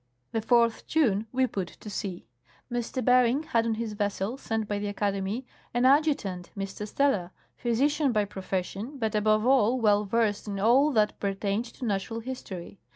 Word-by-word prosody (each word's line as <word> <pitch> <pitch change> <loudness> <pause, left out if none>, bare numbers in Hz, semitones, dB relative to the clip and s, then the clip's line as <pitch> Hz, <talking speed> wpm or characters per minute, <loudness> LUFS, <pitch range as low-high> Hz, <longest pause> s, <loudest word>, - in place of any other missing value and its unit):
The 225 - -1
4th 235 0 +2
June 225 -9 +2
we 260 0 +2
put 195 -7 -3
to 190 - -14
sea. 195 - -5 0.5
M. 240 - +1 0.2
Bering 250 +3 +4
had 230 -6 +1
on 225 - +1
his 220 -1 -3
vessel, 205 +2 -2
sent 225 -5 -3
by 205 -1 -2
the 205 0 -2
xlcademy, 200 +4 -2 0.3
an 245 +1 +3
adjutant, 270 - +2
M. 195 - -2
Steller, 205 0 0 0.3
physician 280 +4 +1
by 210 -3 +2
profession, 195 +6 -4
but 225 -3 -1
above 215 +1 +2
all 255 -1 +4
well 210 -2 +3
versed 210 0 0
in 200 -1 -3
all 255 +8 +4
that 215 -2 +2
pertained 200 +2 -1
to 245 +2 -8
natural 215 +2 -2
history. 205 -7 -7
220 Hz, 165 wpm, -28 LUFS, 200-250 Hz, 0.5 s, Bering